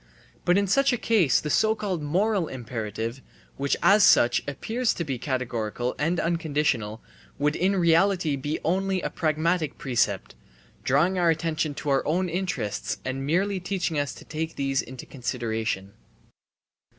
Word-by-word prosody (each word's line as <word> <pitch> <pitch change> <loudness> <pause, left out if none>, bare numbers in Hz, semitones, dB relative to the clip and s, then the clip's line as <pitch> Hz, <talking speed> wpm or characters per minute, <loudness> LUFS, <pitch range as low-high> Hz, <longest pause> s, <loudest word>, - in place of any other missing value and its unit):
But 175 +2 +4
in 200 - +3
such 275 +8 +3
a 245 - +1
case 205 - +3
the 150 - -3
so 220 +6 +3
called 190 -7 -3
moral 185 +4 +1
imperative, 115 -1 -5 0.4
which 140 0 0
as 205 0 +6
such 120 - +5
appears 225 - -1
to 170 - -2
be 135 -6 -3
categorical 125 -2 -2
and 165 +3 +1
unconditional, 150 -10 -1 0.3
would 150 +2 +1
in 190 +2 +1
reality 175 -2 +3
be 145 +3 -3
only 190 +2 0
a - - -2
pragmatic 160 +1 0
precept, 120 -6 0 0.5
drawing 170 +8 +2
our 175 -1 +4
attention 155 -2 0
to 145 - -2
our 135 - +2
own 180 +4 +1
interests 175 - -2
and 135 +1 -3
merely 190 +5 +1
teaching 180 -4 -1
us 145 -1 -2
to - - -13
take 160 +1 -4
these 135 -1 0
into 130 -1 -9
consideration. 115 -6 -3
155 Hz, 150 wpm, -26 LUFS, 130-180 Hz, 0.5 s, as